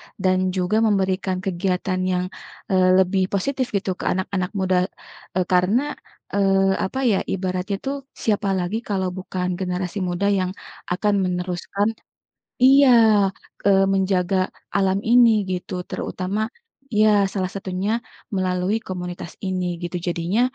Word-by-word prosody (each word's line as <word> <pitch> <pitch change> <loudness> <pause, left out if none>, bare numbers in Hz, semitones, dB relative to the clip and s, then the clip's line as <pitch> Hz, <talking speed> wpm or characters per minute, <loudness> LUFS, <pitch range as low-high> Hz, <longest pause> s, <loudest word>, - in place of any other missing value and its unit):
dan 185 0 +1
juga 190 +4 +1
memberikan 190 -3 +1
kegiatan 185 0 -1
yang, 180 0 0 0.5
eee, 185 -1 +4
lebih 185 0 0
positif 255 +6 -1
gitu 190 -2 -1
ke - - -5
anak-anak 185 0 -1
muda 185 -1 +2 0.5
e 185 - +2
karena, 210 +11 +2 0.4
eee, 195 -1 +3
apa 265 +8 -2
ya? 215 -6 +3
Ibaratnya 185 +1 -2
itu 270 - -1 0.2
siapa 205 -2 0
lagi 185 +5 -1
kalau 190 -5 -2
bukan 180 0 -3
generasi 180 +1 -2
muda 185 +2 0
yang 185 +1 -2 0.3
akan 205 +3 +1
meneruskan 180 +2 -1 0.7
iya, 270 +1 +7 0.8
eee, 195 -1 +5
menjaga 190 -1 +1 0.4
alam 195 0 +2
ini 235 +2 +6 0.2
gitu 180 0 -3
terutama 190 +3 -3 0.5
iya, 215 +1 +4 0.2
salah 185 -2 -1
satunya 190 +1 -3 0.5
melalui 185 +2 0
komunitas 180 -2 -6
ini 185 -2 -2 0.2
gitu. 175 +1 -3
Jadinya, 175 +6 0
190 Hz, 125 wpm, -22 LUFS, 180-200 Hz, 0.8 s, iya